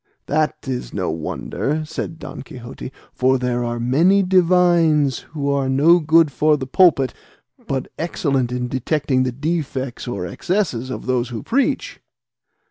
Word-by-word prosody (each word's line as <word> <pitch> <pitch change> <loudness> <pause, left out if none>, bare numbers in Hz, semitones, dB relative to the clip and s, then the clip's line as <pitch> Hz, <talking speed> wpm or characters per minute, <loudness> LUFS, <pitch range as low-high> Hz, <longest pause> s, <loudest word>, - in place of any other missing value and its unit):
"That 155 0 -1
is 125 -2 -4
no 95 -4 -1
wonder," 135 - -3
said 160 +1 -5
Don - - -8
Quixote; 125 0 -9 0.2
"for 130 +1 +2
there 125 -1 -1
are 120 0 -3
many 165 +12 +3
divines 175 -6 +3
who 145 -2 -6
are 140 -1 0
no 155 +6 +5
good 160 -1 +4
for 150 +3 +2
the 135 - -5
pulpit, 135 - +3 0.5
but 135 -1 -2
excellent 140 -6 -1
in 125 0 -2
detecting 130 +1 0
the 130 0 0
defects 135 -3 -3
or 120 -7 -3
excesses 140 - -2
of - - -6
those 125 -1 0
who 115 -3 -6
preach." 270 +3 -1
140 Hz, 145 wpm, -20 LUFS, 125-160 Hz, 0.5 s, no